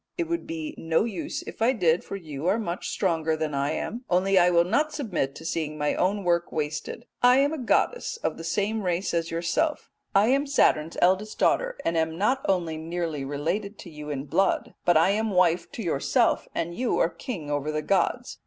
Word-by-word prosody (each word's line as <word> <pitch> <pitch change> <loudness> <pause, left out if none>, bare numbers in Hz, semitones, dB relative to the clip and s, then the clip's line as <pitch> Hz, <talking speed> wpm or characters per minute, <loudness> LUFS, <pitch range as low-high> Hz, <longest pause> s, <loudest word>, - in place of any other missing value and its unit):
It 345 -2 -1
would 340 0 -3
be 160 -2 -5
no 165 +2 +1
use 215 -7 -4
if - - -10
I 240 +3 +4
did, 175 -7 +2
for - - -6
you 155 -4 -5
are 195 +4 +3
much 185 -5 -3
stronger 160 -4 0
than 155 -1 -2
I 140 +1 0
am, 235 +9 -4
only 185 +2 +3
I 175 0 +5
will 170 -1 +4
not 295 - +1
submit 180 - -2
to 160 - -10
seeing 155 -2 -2
my 150 0 0
own 200 +2 0
work 170 -1 +1
wasted. 150 -1 -4 0.2
I 250 +1 +6
am 285 +3 +3
a 315 - -4
goddess 475 - 0
of - - 0
the 165 - -7
same 210 +5 -1
race 180 0 -1
as 165 -1 0
yourself. 170 - -1 0.2
I 205 +4 +5
am 275 +2 +2
Saturn's 165 - +2
eldest 190 +4 +2
daughter - - +1
and 165 - +1
am 160 0 0
not 255 +8 +1
only 170 -4 0
nearly 165 -2 -3
related 165 +9 -3
to 175 - -11
you 150 -1 -8
in 140 -1 -3
blood, 195 +7 +1
but 175 -2 +5
I 165 +4 +4
am 220 +2 0
wife 180 -3 +2
to 230 - -5
yourself, 180 - +1
and 170 +1 -2
you 245 +6 0
are - - +3
king 165 - -6
over 145 +1 -1
the 155 0 -2
gods. 195 +3 0
175 Hz, 210 wpm, -26 LUFS, 160-215 Hz, 0.2 s, I